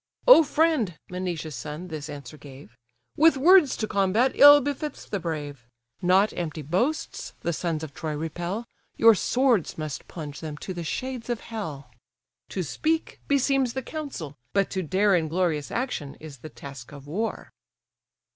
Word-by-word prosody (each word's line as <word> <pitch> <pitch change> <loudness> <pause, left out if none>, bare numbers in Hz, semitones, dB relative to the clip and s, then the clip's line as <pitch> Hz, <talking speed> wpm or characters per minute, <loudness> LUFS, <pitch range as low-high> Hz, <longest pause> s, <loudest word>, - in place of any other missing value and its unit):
"O - - +10
friend 295 - +1
(Menoetius' 175 -4 -4
son 150 +9 -7
this 155 -2 -6
answer 145 -1 -8
gave) 135 -5 -13 0.4
With 320 -1 +5
words 335 +1 +6
to 215 - -2
combat, 205 +6 +2
ill 290 +1 +9
befits 290 +2 -4
the 200 - -3
brave; 145 -7 -5 0.3
Not 190 +4 +3
empty 160 -3 -4
boasts 245 - -2
the 170 - -1
sons 160 -1 -2
of 150 -3 -7
Troy 160 -2 -4
repel, 175 +8 -4 0.3
Your 230 0 +7
swords 245 - +1
must 155 -3 -5
plunge 150 -4 -7
them 155 -2 -6
to 185 - -6
the 175 -1 -5
shades 250 +7 -4
of 240 -2 -2
hell. 155 - -7 0.6
To 185 - -3
speak, 320 - -2
beseems 270 -3 +2
the 265 - -4
council; 275 - -6 0.2
but 200 -1 +1
to 190 - -1
dare 195 +4 +2
In 165 -3 +1
glorious 160 -3 -1
action, 235 - -3
is 150 -4 -11
the 155 - -9
task 140 -5 -10
of 140 -1 -11
war." 210 +10 -4
180 Hz, 160 wpm, -26 LUFS, 155-250 Hz, 0.6 s, O